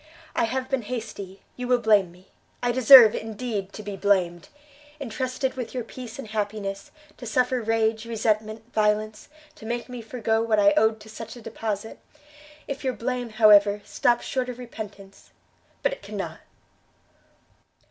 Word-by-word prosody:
I - - +2
have 255 +3 -2
been 270 -2 -1
hasty, 205 -5 -7
you 250 0 -5
will 250 0 +4
blame 210 -6 +3
me; 180 +2 -20 0.3
I 245 - +2
deserve, 245 -2 +9
indeed, 215 -3 -4
to 215 - -8
be 205 -1 -5
blamed! 185 -3 +1 0.5
entrusted 260 0 -3
with 255 -1 -6
your 250 - -2
peace 240 0 -9
and 270 -6 -8
happiness, 205 -2 -3 0.3
to 245 - -8
suffer 250 +2 +1
rage, 225 0 0
resentment, 215 -1 -1
violence, 215 0 0 0.2
to 220 - -14
make 240 +2 -3
me 250 -1 -6
forego 225 -1 -1
what 225 -1 +1
I 200 0 +6
owed 220 +2 +3
to 220 - -13
such 225 +2 -8
a - - -10
deposite! 220 -1 -5 0.7
If 275 -1 -5
your 260 -1 0
blame, 245 0 -3
however, 210 -2 +5
stops 240 +3 +1
short 255 -2 -2
of 245 - -6
repentance 205 -5 -10 0.5
but - - +2
it - - -10
cannot!" - - -6
220 Hz, 160 wpm, -25 LUFS, 210-245 Hz, 0.7 s, deserve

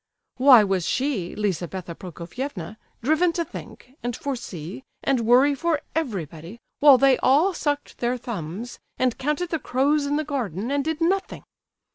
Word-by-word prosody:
Why 255 -3 +8
was 190 -3 0
she, 255 -10 -1
Lizabetha 185 -3 -3
Prokofievna, 185 - -7 0.3
driven 315 +6 +3
to 335 0 -1
think, 255 - -11
and 240 -1 -3
foresee, 210 - -6 0.2
and 270 -2 +2
worry 260 +4 +6
for 315 +2 0
everybody, 190 - -4 0.2
while 285 -3 +8
they 270 -1 +4
all 310 +9 +4
sucked 290 -3 -3
their 245 +1 0
thumbs, 225 -1 -6 0.2
and 255 -2 +1
counted 300 +5 -1
the 325 - 0
crows 285 +3 +1
in 290 - 0
the 305 - 0
garden, 240 - -3
and 285 0 +1
did 320 +2 -3
nothing? 380 +3 0
255 Hz, 150 wpm, -24 LUFS, 200-290 Hz, 0.3 s, Why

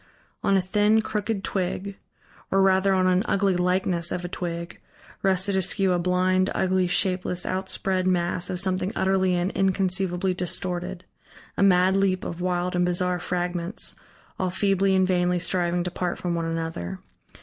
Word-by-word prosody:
On 195 - +3
a - - +3
thin, 210 +3 +3
crooked 210 -1 -2
twig, 195 +1 -2 0.5
or 195 - +2
rather 190 0 +3
on 185 -1 +3
an 185 0 +3
ugly 195 -1 +1
likeness 180 -1 0
of 180 - -3
a - - -2
twig 170 -1 -5 0.4
rested 190 0 +1
askew 190 0 +1
a 175 - +1
blind, 185 +1 +2
ugly, 185 -1 +1
shapeless, 180 0 0
outspread 190 0 -1
mass 175 -1 0
of 180 - -3
something 185 0 0
utterly 190 -1 +2
and 175 +2 0
inconceivably 190 -1 0
distorted, 180 0 -3 0.5
a - - -2
mad 190 -1 +4
leap 195 -1 +1
of 170 +1 -5
wild 180 0 -1
and 180 - +2
bizarre 180 0 0
fragments, 175 +2 -3 0.5
all 185 - 0
feebly 195 +1 +2
and 190 0 +4
vainly 180 -1 +2
striving 175 0 0
to 180 - -3
part 180 0 -2
from 175 -1 -2
one 165 -1 -1
another. 165 - -4
185 Hz, 160 wpm, -25 LUFS, 180-190 Hz, 0.5 s, mad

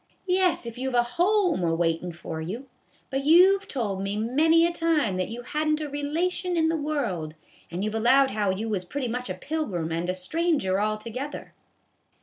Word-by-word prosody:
" - - -41
Yes, 365 -6 +2
if 235 +1 -7
you 265 - -2
have 245 -2 +2
a - - +4
home 360 - +2
a 165 -1 +1
waitin' 165 +1 0
for 160 -1 -6
you; 220 +12 -6 0.4
but 270 +1 -1
you've 365 +6 +6
told 205 -8 -2
me 200 +1 -2
many 310 +9 +4
a 340 - 0
time 320 - +1
that 185 - -1
you 235 +2 -6
hadn't 305 +3 0
a 305 - -3
relation 335 +5 -1
in 320 -1 +3
the 325 - +1
world. 240 - -2 0.3
And 175 +3 -4
you 215 - -1
've - - -9
allowed 260 +5 +4
how 205 -1 0
you 195 +4 -2
was 205 -4 -1
pretty 260 +8 -3
much 250 +2 -4
a - - -3
pilgrim 200 - -3
and 170 +2 -2
a 185 - 0
stranger 200 - 0
altogether." 225 +7 -4
250 Hz, 200 wpm, -26 LUFS, 195-315 Hz, 0.4 s, you've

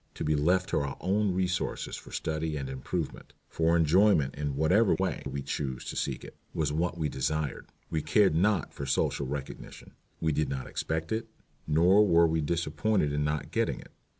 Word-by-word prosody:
To - - -4
be 75 0 +2
left 90 +6 +2
to - - +1
our 70 -1 -3
own 100 +2 +1
resources 90 -1 -1
for - - -11
study 80 -1 -2
and 70 -2 -4
improvement, 65 +5 -5
for 80 +1 +2
enjoyment 80 -3 +4
in 70 -1 -3
whatever 90 +9 +4
way 95 -1 -1
we 70 0 -4
chose 65 -2 -3
to - - -5
seek - - -2
it, - - -11 0.2
was 75 -2 0
what 85 +2 -1
we 80 -2 0
desired. 75 +1 -2 0.2
We 80 - 0
cared 95 +5 +3
not 95 +2 +1
for 70 - -5
social 70 0 0
recognition. 70 0 -7 0.3
We 80 - +1
did 75 +1 0
not 65 -1 -3
expect 80 0 -3
it, 110 +1 -1 0.4
nor 85 +7 +5
were 85 -2 +5
we 80 0 +1
disappointed 75 +2 0
in 75 0 0
not 75 0 -2
getting - - 0
it. - - -14
80 Hz, 185 wpm, -29 LUFS, 75-90 Hz, 0.4 s, nor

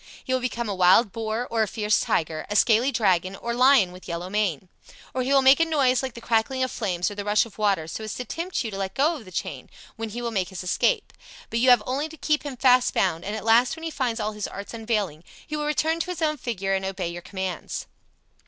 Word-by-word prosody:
He 260 - -2
will 255 - +1
become 240 -2 -2
a 205 - -2
wild 190 +4 +5
boar 225 +3 -3
or 230 -1 +1
a 215 - +2
fierce 210 0 +1
tiger, 155 -1 -1
a 205 - -3
scaly 235 +5 +4
dragon 190 -6 +1
or 235 +4 -4
lion 250 -6 +5
with 180 +1 -13
yellow 175 +1 -5
mane. 195 -5 -1 0.5
Or 255 - -1
he 255 +2 -1
will 275 -1 +5
make 265 +2 +7
a - - +5
noise 275 -6 +2
like 260 -3 -5
the 235 - -9
crackling 240 +4 +1
of 255 - -1
flames 185 -6 -1
or - - -5
the 205 0 -5
rush 210 +2 +3
of 220 -2 -15
water, 200 -6 +1
so 220 - -6
as 215 - -5
to 250 - -5
tempt 335 +2 -3
you 225 - -4
to 195 - -5
let 190 -1 -3
go 300 +2 +1
the 185 - -13
chain, - - -5 0.3
when 225 0 -4
he 230 +3 -6
will 235 - -2
make 190 -4 -1
his 190 -1 -7
escape. 420 - 0 0.4
But 230 - 0
you 255 +2 +4
have 245 -4 +6
only 280 +5 -2
to 320 - -12
keep 305 0 +1
him 285 -4 -6
fast 250 -1 +4
bound, 175 -3 +1
and 205 +2 -4
at 220 - -6
last 235 +4 +4
when 325 - -11
he 325 - -3
finds 245 -6 -1
all 215 0 -1
his 210 -1 -4
arts 200 +3 -8
unavailing, 215 -8 -2 0.2
he 305 - -5
will 300 0 -2
return 320 +2 +1
to 335 - -2
his 345 -2 -3
own 305 -1 +1
figure 195 -7 -2
and 190 0 0
obey 190 -2 -3
your 175 +1 -7
commands." 190 0 -5
225 Hz, 260 wpm, -25 LUFS, 195-260 Hz, 0.5 s, make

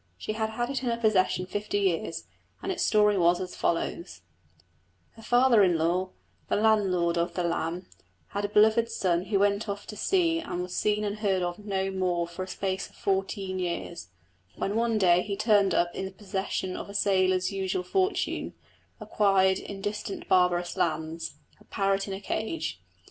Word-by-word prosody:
She 215 - -4
had 220 0 -1
had 240 +4 -2
it 270 - -2
in 250 - -1
her 230 - 0
possession 190 -5 +2
fifty 205 +2 -3
years, 165 -4 -1 0.4
and 385 - -1
its 355 - -1
story 210 -2 +4
was 175 0 +4
as 185 -1 -5
follows: 165 - -2 0.9
Her 225 - -15
father 245 -1 +4
in 180 -4 +4
law, 175 +3 0 0.4
the - - +2
landlord 190 -6 +2
of 170 - -1
the 180 - 0
Lamb, 170 +1 -2 0.4
had 205 - -3
a 205 - -1
beloved 220 +2 +4
son 180 -5 0
who 200 0 +1
went 200 +2 +1
off 200 0 -4
to 210 - -8
sea 330 - +2
and 180 - -4
was 180 0 -6
seen 210 0 +1
and 210 0 -3
heard 195 -4 +1
of 175 +1 -3
no 195 -2 -2
more 180 -2 0
for 170 +2 -8
a 185 - -4
space 190 0 -3
of - - -23
fourteen 195 -1 -2
years, 170 - -4 0.5
when 200 - -2
one 230 -1 +1
day 180 -3 +4
he 200 0 -4
turned 205 -4 +3
up 175 0 +1
in 190 - -4
the 190 - -6
possession 190 -1 -3
of - - -6
a 200 - -9
sailor's 185 -1 +2
usual 190 -2 -2
fortune, 375 - -1 0.4
acquired 190 -2 +2
in 200 -1 -8
distant 205 0 -4
barbarous 180 -1 +2
lands 160 0 -2 0.2
a - - -19
parrot 195 -1 0
in 195 - -4
a - - -6
cage! 220 +9 -3
195 Hz, 185 wpm, -28 LUFS, 180-210 Hz, 0.9 s, story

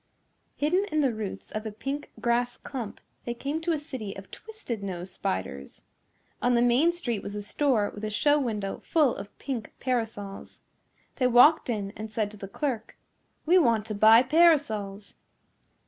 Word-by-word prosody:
Hidden 355 +7 +1
in 310 0 +2
the 265 -4 +2
roots 215 -3 -6
of 215 - -4
a 220 - -5
pink 275 +7 -5
grass 240 +1 0
clump, 245 -7 -6 0.2
they 240 - -4
came 285 +6 -3
to 340 +1 0
a 320 - +1
city 260 -9 -6
of 195 0 -11
twisted 425 - -7
nose 185 -2 -5
spiders. 70 - -4 0.6
On 245 0 +3
the 235 - +4
main 250 +8 +4
street 245 - -3
was 200 - -6
a 205 - -4
store 225 -2 +1
with 210 - -9
a 215 - -1
show 290 +7 +3
window 210 -7 -3
full 300 -7 +2
of 200 +1 -9
pink 250 -6 -5
parasols. 225 -6 -3 0.6
They 255 - +3
walked 250 +5 +6
in 205 -4 -2
and 215 +1 -7
said 215 -1 -2
to 210 - -12
the 195 - -7
clerk, 235 0 -4 0.5
"We 355 +4 +6
want 230 - +2
to 215 - -4
buy 220 +3 +7
parasols." 255 -10 +2
235 Hz, 175 wpm, -27 LUFS, 210-285 Hz, 0.6 s, buy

